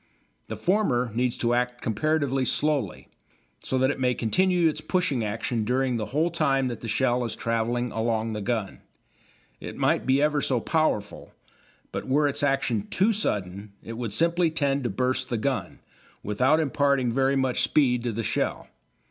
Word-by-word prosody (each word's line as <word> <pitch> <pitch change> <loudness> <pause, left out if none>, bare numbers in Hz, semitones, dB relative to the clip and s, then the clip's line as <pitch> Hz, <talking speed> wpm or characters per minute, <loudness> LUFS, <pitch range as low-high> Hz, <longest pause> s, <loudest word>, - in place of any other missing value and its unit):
The - - -5
former 170 - +1
needs 125 +1 0
to 120 0 +1
act 125 0 0
comparatively 135 +3 0
slowly, 140 -5 -1 0.6
so 130 - -1
that 130 +1 +3
it 145 - -6
may 125 -1 +1
continue 180 - +2
its 155 - -2
pushing 160 -10 0
action 115 +2 -2
during 125 +2 0
the 110 - -3
whole 155 +6 0
time 135 -5 +1
that 120 -3 -6
the 115 - -6
shell 125 +2 +1
is 115 - -3
travelling 115 +1 -1
along 110 0 -1
the 105 - -4
gun. 105 -2 -3 0.8
It - - -8
might - - +1
be 135 +1 +4
ever 150 0 +2
so 130 -3 +1
powerful, 135 -8 -1 0.6
but - - -5
were 145 +3 +3
its 145 +1 -1
action 135 -7 0
too 210 +4 +2
sudden 100 - -3
it 115 - -7
would 115 -2 -4
simply 170 - +2
tend 140 -4 0
to - - +1
burst 130 +4 -1
the 120 - -1
gun, 130 +4 -3 0.4
without 130 +9 +2
imparting 140 -4 +1
very 135 +2 +2
much 130 -2 +1
speed 125 -5 +3
to 120 0 -2
the 115 +1 -3
shell. - - -2
130 Hz, 175 wpm, -26 LUFS, 115-145 Hz, 0.8 s, be